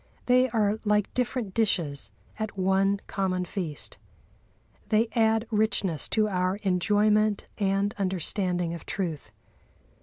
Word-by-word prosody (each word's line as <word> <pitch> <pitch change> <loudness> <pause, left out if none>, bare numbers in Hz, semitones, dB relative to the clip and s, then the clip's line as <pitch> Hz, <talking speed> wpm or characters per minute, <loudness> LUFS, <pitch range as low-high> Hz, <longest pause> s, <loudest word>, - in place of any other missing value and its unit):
They 255 +1 +4
are 215 -2 +1
like 210 -1 +1
different 245 -5 -2
dishes 170 -10 0 0.3
at 215 -2 -4
one 195 +1 +2
common 185 -2 -1
feast. 170 -5 -4 0.9
They 225 +1 +3
add 225 -1 +3
richness 205 -7 +1
to 215 -1 +2
our 185 -1 0
enjoyment 210 +3 +2
and 200 +1 +1
understanding 180 -2 -1
of 170 - -9
truth. 170 -7 -3
200 Hz, 115 wpm, -27 LUFS, 185-215 Hz, 0.9 s, They